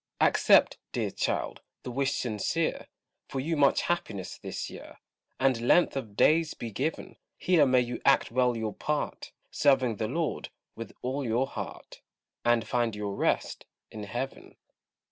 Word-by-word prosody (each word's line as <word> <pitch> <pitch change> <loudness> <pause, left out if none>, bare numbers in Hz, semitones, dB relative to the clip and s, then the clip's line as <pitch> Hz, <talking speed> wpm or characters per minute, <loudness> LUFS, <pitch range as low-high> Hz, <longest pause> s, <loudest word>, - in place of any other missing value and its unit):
Accept, - - +5
dear - - -1
child, - - -2 0.2
the 125 - -5
wish 135 +2 0
sincere, 125 +8 -1 0.4
For 135 - -4
you 160 +5 -1
much 140 -2 +4
happiness 100 - -2
this - - -5
year, - - -11 0.4
And 130 -3 +2
length 155 +8 +4
of 110 -7 -5
days 160 0 +4
be 115 - -6
given; 135 +10 -3 0.2
Here 170 -6 +4
may 130 -1 +4
you 120 0 -4
act 140 - +4
well 125 -1 +2
your 110 -2 -3
part, 150 -1 -3 0.2
Serving 130 -6 +3
the 110 - -1
Lord 160 +6 -2 0.3
with 115 -2 -7
all 135 +3 -2
your 120 +2 +1
heart, - - -8 0.4
And 120 -1 +2
find 120 -3 0
your 105 -1 -3
rest - - -1 0.2
in 105 -1 -7
heaven. 120 +6 -5
125 Hz, 150 wpm, -28 LUFS, 115-140 Hz, 0.4 s, Accept